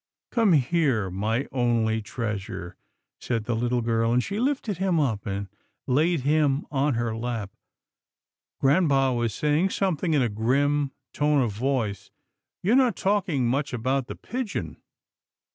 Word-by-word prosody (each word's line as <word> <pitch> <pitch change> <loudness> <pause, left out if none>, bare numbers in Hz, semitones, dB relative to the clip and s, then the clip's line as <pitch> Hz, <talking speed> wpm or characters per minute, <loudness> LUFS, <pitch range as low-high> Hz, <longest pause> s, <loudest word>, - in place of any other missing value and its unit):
" - - -67
Come 225 -6 +3
here, 135 - +2
my 110 +8 -1
only 115 -3 +1
treasure," 100 -5 -5 0.4
said 115 -3 -2
the 120 +1 -1
little 120 +1 0
girl, 115 0 +1
and 125 +1 +2
she 200 +1 -3
lifted 245 - -1
him 190 -4 +2
up 115 -8 -1
and 100 0 -3 0.4
laid 155 +4 +2
him 145 0 +2
on 140 -1 +1
her 115 -1 -1
lap. 115 -3 -4 1.1
Grampa 135 -3 +3
was 120 -2 0
saying 150 - +1
something 180 -4 0
in 140 - +3
a - - +2
grim 135 +6 +1 0.2
tone 145 -2 +2
of 115 - -1
voice. 110 -3 -2 0.3
" - - -62
You're 210 +7 +3
not 255 -6 +4
talking 190 -10 +1
much 140 +3 -1
about 130 +2 -1
the - - -6
pigeon." 245 -3 -4
130 Hz, 150 wpm, -25 LUFS, 115-155 Hz, 1.1 s, not